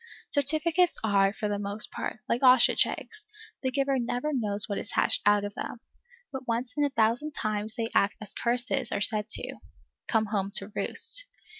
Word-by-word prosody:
Certificates 315 Hz, +5 st, +2 dB
are, 200 Hz, -2 st, +3 dB
for 210 Hz, 0 st, -4 dB
the 205 Hz, -1 st, -2 dB
most 205 Hz, +1 st, 0 dB
part, 225 Hz, -, -5 dB
like 235 Hz, -, -1 dB
ostrich 255 Hz, -2 st, +5 dB
eggs; 430 Hz, -1 st, -3 dB, 0.3 s
the 260 Hz, -, -1 dB
giver 275 Hz, 0 st, 0 dB
never 245 Hz, +5 st, -2 dB
knows 210 Hz, -5 st, +4 dB
what 200 Hz, -, -3 dB
is -, -, -7 dB
hatched -, -, +3 dB
out 205 Hz, 0 st, +4 dB
of 205 Hz, 0 st, -5 dB
them. 240 Hz, -, -6 dB, 0.5 s
But 265 Hz, -1 st, -7 dB
once 240 Hz, +2 st, -2 dB
in 295 Hz, -, +1 dB
a 285 Hz, -, +2 dB
thousand 240 Hz, +5 st, 0 dB
times 215 Hz, -2 st, -3 dB
they 230 Hz, 0 st, -3 dB
act 200 Hz, -, +2 dB
as 210 Hz, -2 st, -5 dB
curses 245 Hz, +1 st, -1 dB
are -, -, -1 dB
said 210 Hz, +1 st, +1 dB
to, -, -, -3 dB, 0.5 s
come 225 Hz, -2 st, +1 dB
home 200 Hz, -2 st, -2 dB
to 195 Hz, +2 st, 0 dB
roost. -, -, +3 dB
235 Hz, 185 wpm, -27 LUFS, 210-270 Hz, 0.5 s, ostrich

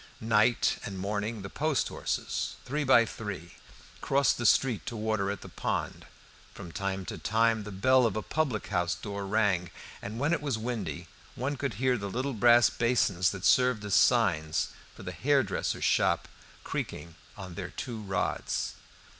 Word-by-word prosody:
Night 110 Hz, +1 st, +2 dB
and 100 Hz, -2 st, -5 dB
morning 105 Hz, +2 st, -3 dB
the 95 Hz, -, -6 dB
post 155 Hz, -2 st, 0 dB
horses, -, -, -3 dB
three 150 Hz, +4 st, -1 dB
by 125 Hz, -4 st, +6 dB
three, 100 Hz, -7 st, -6 dB, 0.5 s
crossed 140 Hz, -2 st, +2 dB
the 120 Hz, -, +2 dB
street 125 Hz, 0 st, +3 dB
to 120 Hz, -, -4 dB
water 110 Hz, -2 st, -1 dB
at 100 Hz, -2 st, -4 dB
the -, -, -9 dB
pond. -, -, -3 dB, 0.5 s
From 85 Hz, -, -9 dB
time 95 Hz, 0 st, -3 dB
to -, -, -6 dB
time 110 Hz, 0 st, +2 dB
the 105 Hz, -, -7 dB
bell 125 Hz, +6 st, +4 dB
of 110 Hz, -, -3 dB
a 110 Hz, -, -2 dB
public 140 Hz, -9 st, -1 dB
house 90 Hz, -3 st, 0 dB
door 100 Hz, +2 st, -5 dB
rang, 95 Hz, -4 st, +1 dB, 0.3 s
and 110 Hz, +3 st, -6 dB
when 145 Hz, +6 st, +1 dB
it -, -, 0 dB
was 140 Hz, -6 st, -1 dB
windy 110 Hz, -, -4 dB, 0.3 s
one 135 Hz, +4 st, -2 dB
could 135 Hz, -5 st, -3 dB
hear 125 Hz, +2 st, +1 dB
the 100 Hz, 0 st, -4 dB
little 130 Hz, +6 st, -2 dB
brass 120 Hz, +1 st, +6 dB
basins 115 Hz, -7 st, +2 dB
that 100 Hz, -1 st, -5 dB
served 125 Hz, -4 st, +4 dB
as 100 Hz, -, -2 dB
signs 85 Hz, -10 st, +3 dB, 0.3 s
for -, -, -11 dB
the -, -, -5 dB
hairdresser's -, -, 0 dB
shop -, -, +2 dB, 0.4 s
creaking 85 Hz, -, -5 dB, 0.2 s
on 95 Hz, -3 st, -8 dB
their 90 Hz, -1 st, -5 dB
two 115 Hz, +4 st, -6 dB
rods. 100 Hz, 0 st, -2 dB
110 Hz, 170 wpm, -29 LUFS, 95-125 Hz, 0.5 s, by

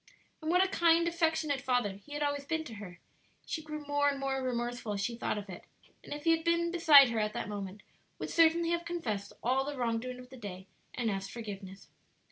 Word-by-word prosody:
And 315 Hz, -, -3 dB
what 360 Hz, +2 st, +5 dB
a -, -, 0 dB
kind, 335 Hz, -2 st, +4 dB
affectionate 320 Hz, -4 st, +1 dB
father 245 Hz, -5 st, +1 dB
he 290 Hz, -, -11 dB
had 295 Hz, 0 st, -1 dB
always 285 Hz, -1 st, -1 dB
been 320 Hz, +2 st, -2 dB
to 240 Hz, -, -9 dB
her; 180 Hz, -4 st, -9 dB, 0.5 s
she 320 Hz, -, -3 dB
grew 305 Hz, -1 st, -7 dB
more 290 Hz, 0 st, +2 dB
and 280 Hz, -1 st, -2 dB
more 270 Hz, -1 st, -1 dB
remorseful 240 Hz, -3 st, -2 dB
as 200 Hz, -, -2 dB
she 235 Hz, +3 st, -1 dB
thought 230 Hz, -, -2 dB
of 205 Hz, -1 st, -6 dB
it; 180 Hz, -2 st, -9 dB, 0.4 s
and -, -, -13 dB
if 295 Hz, 0 st, -5 dB
he 330 Hz, -, +4 dB
had 325 Hz, 0 st, +2 dB
been 340 Hz, 0 st, +2 dB
beside 310 Hz, -6 st, +8 dB
her 230 Hz, -1 st, -1 dB
at 210 Hz, 0 st, 0 dB
that -, -, -3 dB
moment 205 Hz, -1 st, -6 dB, 0.3 s
would -, -, -5 dB
certainly 335 Hz, 0 st, +4 dB
have 340 Hz, 0 st, 0 dB
confessed 225 Hz, -13 st, -3 dB
all 260 Hz, +3 st, +2 dB
the 285 Hz, 0 st, -5 dB
wrong 230 Hz, -2 st, 0 dB
doing 250 Hz, +1 st, -6 dB
of 250 Hz, 0 st, -12 dB
the 260 Hz, -, -10 dB
day 190 Hz, -5 st, -7 dB, 0.3 s
and 235 Hz, -3 st, 0 dB
asked 195 Hz, 0 st, -3 dB
forgiveness. 195 Hz, -4 st, -8 dB
265 Hz, 230 wpm, -32 LUFS, 215-320 Hz, 0.5 s, beside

